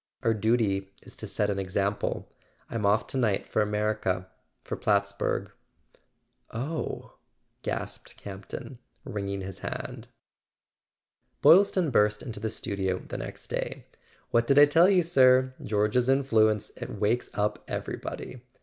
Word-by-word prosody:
Our 115 - +3
duty 105 -3 +1
is - - -12
to - - -6
set 105 0 0
an 100 - -2
example. 100 +2 -1 0.4
I'm 110 -3 0
off 105 +2 +3
to 135 - -2
night 110 -6 +1
for - - +1
America—for 105 -3 -2
Plattsburg." 100 -1 0 1.0
"Oh 140 +8 -4 0.2
" - - -48
gasped - - -5
Campton, 100 +6 -8 0.3
wringing 100 -6 -3
his 95 -1 -7
hand. - - -5 1.4
Boylston 185 -3 +6
burst 105 -2 +3
into 110 -3 -6
the 110 +1 -2
studio 95 -4 -2
the - - -7
next - - -7
day. - - -3 0.5
"What 115 0 +3
did 140 - +4
I 145 - +10
tell 165 +5 +5
you, 185 -3 +4
sir? 130 -5 +5
George's 105 +4 +1
influence—it 110 -6 +2
wakes 110 +4 +1
up 105 0 -1
everybody. 125 - -5
110 Hz, 130 wpm, -28 LUFS, 100-130 Hz, 1.4 s, I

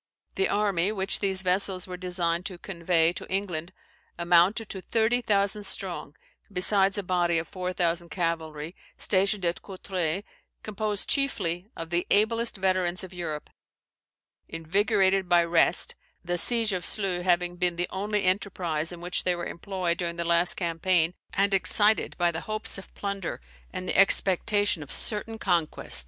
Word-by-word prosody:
The 390 - 0
army 200 -2 +1
which 195 -2 +1
these 190 -2 -1
vessels 185 0 +1
were 180 - -7
designed 175 -1 -1
to 185 -3 -8
convey 170 -2 +1
to - - -9
England 180 -3 -2 0.5
amounted 175 +6 +3
to 190 - -6
thirty 230 +4 +1
thousand 205 -1 +1
strong, - - -3 0.4
besides 195 +1 +4
a 205 - -2
body 175 -2 +1
of 160 - -2
four 185 -1 -4
thousand 170 -1 -1
cavalry, 165 -1 -3 0.2
stationed 195 0 +1
at 170 0 -1
Courtroi, 185 -2 -3 0.4
composed 210 -1 -1
chiefly 195 - -1
of 165 0 -7
the 175 0 0
ablest 230 +2 +2
veterans 185 -1 0
of 190 0 -9
Europe; 160 -4 -5 1.0
invigorated 190 +3 +1
by 175 -1 +5
rest, 170 0 +3 0.3
(the 175 +1 -1
siege 230 -1 +4
of 180 -1 -3
Sluys 190 -4 +1
having 175 -1 +1
been 175 -1 0
the 175 +1 -1
only 205 +1 -2
enterprise 180 -4 -1
in 175 -1 -9
which 175 +1 0
they 180 -1 +1
were 175 - -5
employed 175 -1 -3
during 170 -1 -2
the 170 - -3
last 170 +1 +4
campaign,) 170 -1 +1 0.2
and 200 0 +2
excited 205 +3 +2
by 175 -1 +2
the 160 0 -5
hopes 215 -2 -2
of 195 - -14
plunder 200 -3 -4 0.3
and 185 - -6
the - - -1
expectation 195 0 +2
of 145 - -9
certain 225 +1 -4
conquest. 170 - 0
185 Hz, 155 wpm, -27 LUFS, 170-200 Hz, 1.0 s, by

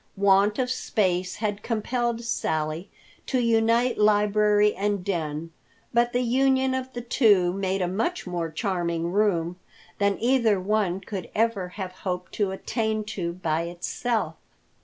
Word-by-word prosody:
Want 200 +1 +4
of 255 -1 0
space 185 -7 0
had 210 -2 -2
compelled 235 +1 -1
Sally 160 -5 -2 0.4
to 260 - 0
unite 230 +1 +2
library 210 0 +4
and 200 -1 -1
den, 165 -3 -3 0.4
but 240 +1 +3
the 245 +1 +1
union 265 +2 +2
of 260 0 -3
the 245 - -4
two 205 -7 +3
made 190 0 -1
a - - 0
much 225 - -2
more 175 -2 -3
charming 170 -2 -2
room 180 -4 +1 0.4
than 200 -1 +2
either 235 -5 +3
one 195 -1 0
could 195 -1 -6
ever 220 -4 +1
have 190 -2 -4
hoped 185 -1 -5
to 205 -2 0
attain 220 +2 -2
to 170 -3 -3
by 165 -2 -1
itself. 210 +7 -2
205 Hz, 140 wpm, -25 LUFS, 180-230 Hz, 0.4 s, Want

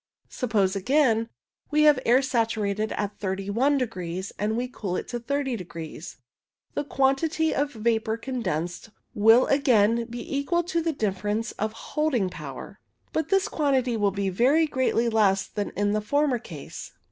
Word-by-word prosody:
Suppose, 210 -6 0
again, 230 +1 +2 0.4
we 300 0 +3
have 300 -3 +6
air 250 +3 +5
saturated 220 -4 0
at 205 0 -4
31 200 +9 0
degrees 185 -7 -4
and 215 +2 0
we 250 +1 -1
cool 200 -7 -4
it - - -3
to 240 - -3
30 270 +1 -1
degrees, 170 -4 -8 0.6
the - - -1
quantity 290 +4 +1
of 285 +1 -1
vapour 220 0 0
condensed 210 - -3 0.2
will 225 +4 +6
again 235 -4 +3
be 240 +4 -5
equal 345 +5 +1
to 340 -1 -1
the 330 0 0
difference 210 -2 -2
of 215 +1 -3 0.2
holding 265 -12 +1
power; 150 +5 -8 0.3
but 315 -1 -1
this 390 +1 +3
quantity 265 - +1
will 205 -2 +2
be 195 0 -2
very 260 - +3
greatly 260 -5 +1
less 205 -4 +3
than 205 -1 -3
in 205 0 +1
the 215 0 0
former 285 +3 +1
case. 155 -9 -9
230 Hz, 155 wpm, -26 LUFS, 205-275 Hz, 0.6 s, have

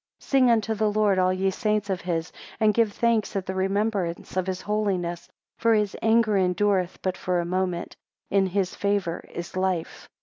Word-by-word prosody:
7 - - -18
"Sing 265 -3 +5
unto 225 -1 +2
the 215 0 +1
Lord, 205 -2 +2
all 185 0 +3
ye 190 +1 0
saints 210 0 0
of 190 -2 -2
his, 165 -1 -2 0.3
and 215 -1 +4
give 225 -1 +2
thanks 230 -1 0
at 195 -2 -1
the 190 - -3
remembrance 195 -2 -1
of 185 0 0
his 185 -1 -3
holiness, 190 -5 -2 0.3
for 230 -1 +4
his 210 -2 0
anger 225 -1 +3
endureth 185 0 +1
but 185 -1 0
for 180 -1 -1
a 170 - -1
moment; 180 -1 -2 0.4
in 195 -1 +3
his 185 0 -1
favour 200 -4 -1
is 175 +2 -7
life." 185 -3 -2
195 Hz, 190 wpm, -25 LUFS, 185-215 Hz, 0.4 s, Sing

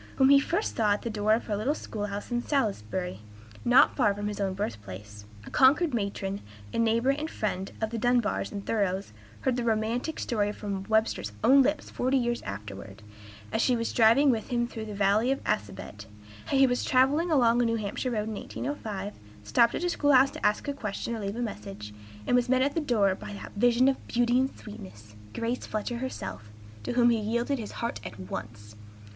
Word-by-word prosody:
whom 265 0 +5
he 280 0 +8
first 345 +9 -1
saw 210 -2 +3
at 205 - -4
the 235 - -3
door 215 0 +2
of 230 - -4
her 210 - -1
little 240 +9 0
school 210 -7 -5
house 205 +3 -6
in 240 0 0
Salisbury, 190 - -2 0.4
not 250 +4 +5
far 210 -7 +2
from 205 0 -3
his 210 - -6
own 195 -2 -1
birthplace. 105 - -6 0.2
A - - -10
Concord 290 +4 +4
matron, 200 -2 -2 0.3
a - - -1
neighbor 230 +3 +3
and 300 +3 -3
friend 195 - -3
of 220 0 -2
the 230 - -3
Dunbars 240 -1 +1
and 200 -1 -6
Thoreaus, 195 - -1 0.3
heard 255 -2 0
the 245 - -1
romantic 230 +6 -1
story 205 -3 0
from 200 -3 -5
Webster's 220 - +1
own 275 +2 +7
lips 290 +2 0
forty 260 +2 +1
years 240 -1 0
afterward, 100 0 -8 0.5
as 225 - +1
she 250 - +3
was 230 -1 -2
driving 240 +5 +5
with 225 -3 -2
him 240 -1 0
through 225 -2 -6
the 210 -1 -7
valley 205 +5 +3
of 275 - +1
the - - +1
Assabet: 105 +1 -5 0.4
how 275 - +1
he 270 - +7
was 245 -1 0
traveling 275 +7 +3
along 245 -6 +4
a - - +2
New 230 0 +1
Hampshire 215 +4 -3
road 215 -3 -2
in 220 - -3
1805, 210 -4 -5 0.3
stopped 115 - +3
at - - -3
a 355 - +1
school 290 -3 +2
house 265 +1 +6
to - - -10
ask 210 +5 +1
a 285 - -1
question 230 -2 -4
or - - -5
leave 200 0 -3
a 240 - -3
message, 105 - -7 0.3
and - - +2
was 245 0 +2
met 260 0 +4
at 285 +1 0
the 330 - 0
door 215 -9 +2
by 200 - -8
that 200 - -8
vision 245 +4 +4
of 270 - 0
beauty 240 +1 +2
and 265 +1 -1
sweetness, 105 - -11 0.2
Grace 235 +2 -2
Fletcher 225 +3 -3
herself, 105 - -6 0.3
to 105 - -3
whom 240 -1 +5
he 230 - +2
yielded 235 +5 -1
his 215 - -6
heart 235 +1 -4
at 105 - -8
once. 105 +3 -7
225 Hz, 210 wpm, -28 LUFS, 200-250 Hz, 0.5 s, he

